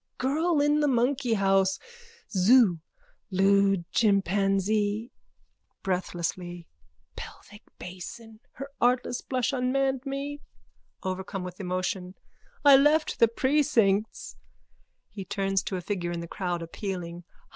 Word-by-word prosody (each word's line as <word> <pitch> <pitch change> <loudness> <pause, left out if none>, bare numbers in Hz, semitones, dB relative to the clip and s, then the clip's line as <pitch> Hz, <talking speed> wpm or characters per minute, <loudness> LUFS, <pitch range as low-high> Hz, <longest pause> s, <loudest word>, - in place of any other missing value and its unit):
Girl 310 +5 +1
in 295 +1 +3
the 295 - +2
monkeyhouse. 225 -7 +2 0.5
Zoo. 195 -2 +5 0.5
Lewd 195 -1 +3
chimpanzee. 205 +2 +1 0.7
(Breathlessly.) 175 -1 -3 0.5
Pelvic 205 0 -11 0.2
basin. 215 +5 -9
Her 275 +1 -8
artless 245 0 +1
blush 255 +1 -1
unmanned 265 0 0
me. 280 +1 -5 0.6
(Overcome 190 0 -4
with 180 +1 -8
emotion.) 185 0 -3 0.5
I 280 -1 +9
left 300 +3 +2
the 230 - +7
precincts. 230 -5 +1 0.7
(He 195 - -7
turns 195 0 -1
to 190 - -2
a - - -5
figure 175 -2 -3
in 170 - -3
the 170 - -7
crowd, 175 -2 -3
appealing.) 175 -1 -6
200 Hz, 105 wpm, -27 LUFS, 185-255 Hz, 0.7 s, I